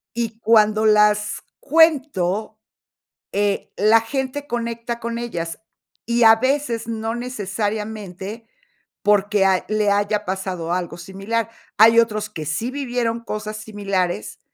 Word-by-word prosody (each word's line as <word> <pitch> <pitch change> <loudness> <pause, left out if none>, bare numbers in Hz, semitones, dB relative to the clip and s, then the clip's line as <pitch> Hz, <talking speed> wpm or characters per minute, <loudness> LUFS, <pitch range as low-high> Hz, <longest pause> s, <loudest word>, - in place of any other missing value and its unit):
Y 230 -1 -3
cuando 215 -1 +4
las 210 -1 +3 0.2
cuento, 260 - +2 0.7
eh, 205 0 0
la 215 +3 +5
gente 265 +4 -4
conecta 235 -1 -3
con 235 0 -4
ellas, 170 -9 -4 0.5
y 235 +1 +2
a 225 0 +8
veces 260 -2 -1
no 225 0 -3
necesariamente, 210 -2 -4 0.5
porque 205 -1 +3
ha 190 -1 +2
le 215 -1 +1
haya 205 +1 +1
pasado 185 -3 -3
algo 175 -1 -2
similar. 195 +6 -3 0.3
Hay 225 +2 +7
otros 215 -2 0
que 155 - -7
sí 160 - -2
vivieron 245 -4 -2
cosas 215 -1 -5
similares 195 - -3
215 Hz, 120 wpm, -21 LUFS, 200-230 Hz, 0.7 s, a